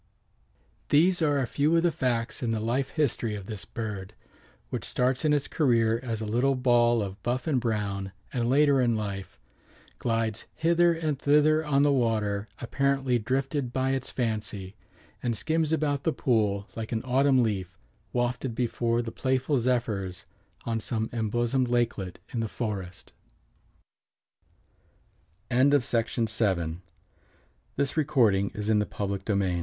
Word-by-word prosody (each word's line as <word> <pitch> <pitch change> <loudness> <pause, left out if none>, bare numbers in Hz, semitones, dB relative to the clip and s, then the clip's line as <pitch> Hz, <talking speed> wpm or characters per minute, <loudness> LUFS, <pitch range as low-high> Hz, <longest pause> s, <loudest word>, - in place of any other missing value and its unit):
These 175 +4 +4
are 145 -2 +3
a 135 - +1
few 150 +7 +2
of 165 - +2
the 175 - +3
facts 120 -5 -1
in 120 - -1
the 115 -1 0
life 125 +5 -1
history 120 -7 0
of 100 -2 -7
this 105 -2 -6
bird, 105 -3 -6 0.6
which - - -3
starts 125 +1 0
in 155 - +3
its 145 -1 +1
career 115 -6 +2
as 115 -4 -3
a - - -2
little 125 +6 +1
ball 120 -3 +3
of 100 0 -7
buff 125 +2 -2
and 140 -6 +1
brown 100 -4 -2 0.2
and 120 -2 0
later 140 0 +4
in 120 -2 +2
life 100 - -5 0.6
"glides 115 -2 -1
hither 170 +1 +3
and 155 -4 -2
thither 150 +2 +4
on 145 -2 +2
the 145 - +4
water, 110 -5 0
apparently 135 0 +1
drifted 135 +3 -1
by 130 +1 0
its 135 -1 -2
fancy, 105 -5 -3 0.5
and 115 -2 -1
skims 160 +2 0
about 145 -3 +1
the 160 - +1
pool 105 -8 0
like 110 -1 -5
an 110 -2 -1
autumn 130 0 +3
leaf 95 -6 -2 0.3
wafted 120 0 -1
before 120 0 0
the 115 - -5
playful 130 +3 0
zephyrs 105 -7 -1 0.4
on 115 -1 -1
some 110 0 -2
embosomed 120 +3 0
lak 120 -1 +2
120 Hz, 125 wpm, -27 LUFS, 110-140 Hz, 0.6 s, These